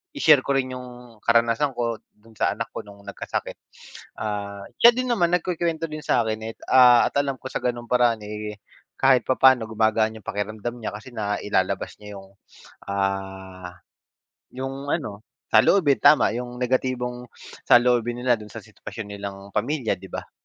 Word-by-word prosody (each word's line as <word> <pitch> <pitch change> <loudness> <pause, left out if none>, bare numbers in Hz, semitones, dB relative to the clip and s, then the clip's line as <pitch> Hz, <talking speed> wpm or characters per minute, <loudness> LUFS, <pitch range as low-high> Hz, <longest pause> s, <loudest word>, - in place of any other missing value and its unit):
i-share 155 - +6
ko 140 - +1
rin 130 -1 0
yung 125 -3 -11
karanasan 115 +4 +2
ko 115 -3 -2 0.2
dun 110 +2 -21
sa - - +1
anak - - -5
ko - - -6
nung 100 -1 -15
nagkasakit. 100 - -5 0.6
Ah, 100 -1 -4 0.2
siya 235 - +9
din 255 0 -2
naman 175 -7 +3
nagkukwento 165 -2 -1
din 155 - -5
sa 120 - +2
akin 110 0 -2
eh - - -16 0.2
ah, 125 -2 +7
at - - -29
alam 140 -1 -1
ko 130 - -7
sa - - -2
ganong 120 -1 -3
paraan 120 -3 +3
eh, 105 0 -6 0.4
kahit 130 -3 +4
papaano 130 -2 +5
gumagaan 110 0 +1
yung - - -21
pakiramdam 105 +3 -3
niya 110 - -4
kasi 120 +4 -10
nailalabas 100 -3 -1
niya 105 -1 -10
yung 95 0 -16 0.6
ah, 95 -2 -4 0.8
yung 135 +2 -5
ano 110 -10 -4 0.3
saloobin. 155 -9 +5
Tama, 150 -7 +5
yung 125 0 -6
negatibong 125 -1 -1 0.4
saloobin 120 0 +4
nila 125 -1 +3
dun 105 -1 -11
sa - - -7
sitwasyon 110 -2 -9
nilang 100 -1 -7
pamilya, 125 +2 0
di - - -12
ba? - - -6
120 Hz, 160 wpm, -24 LUFS, 105-130 Hz, 0.8 s, siya